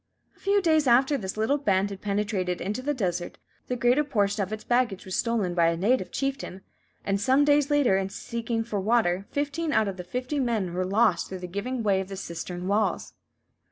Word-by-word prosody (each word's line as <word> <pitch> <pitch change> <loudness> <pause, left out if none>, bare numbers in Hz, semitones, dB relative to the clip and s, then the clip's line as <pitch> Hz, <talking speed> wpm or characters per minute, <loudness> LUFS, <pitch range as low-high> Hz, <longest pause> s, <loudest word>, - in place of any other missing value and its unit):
A - - -28
few 400 0 +2
days 315 -4 +3
after 265 +4 +4
this 195 -6 -4
little 265 +7 +1
band 200 -5 +1
had 195 - -8
penetrated 200 -3 -1
into 210 +7 -3
the 290 +2 -1
desert, 180 -6 -2 0.3
the 250 - -1
greater 245 +4 +3
portion 205 -7 0
of 195 +1 -3
its 215 0 -5
baggage 240 -6 0
was 185 - -4
stolen 225 -7 0
by 170 -1 +3
a 165 0 +1
native 200 +1 +1
chieftain; 270 -9 -3 0.4
and 195 0 0
some 265 +5 +4
days 290 -1 +3
later, 285 -9 +3
in 195 0 -2
seeking 230 +2 -3
for 220 -3 -3
water, 195 -3 +1
fifteen 290 +3 -2
out 220 -7 +2
of 195 -1 -4
the 180 - -6
fifty 250 +10 -3
men 220 -9 -1
were 185 +1 -1
lost 195 -2 +2
through 190 - -5
the 180 - -7
giving 220 +7 -3
way 195 -2 +2
of 190 - -6
the 195 0 -7
cistern 175 0 -5
walls. 210 +2 0
215 Hz, 210 wpm, -26 LUFS, 190-255 Hz, 0.4 s, after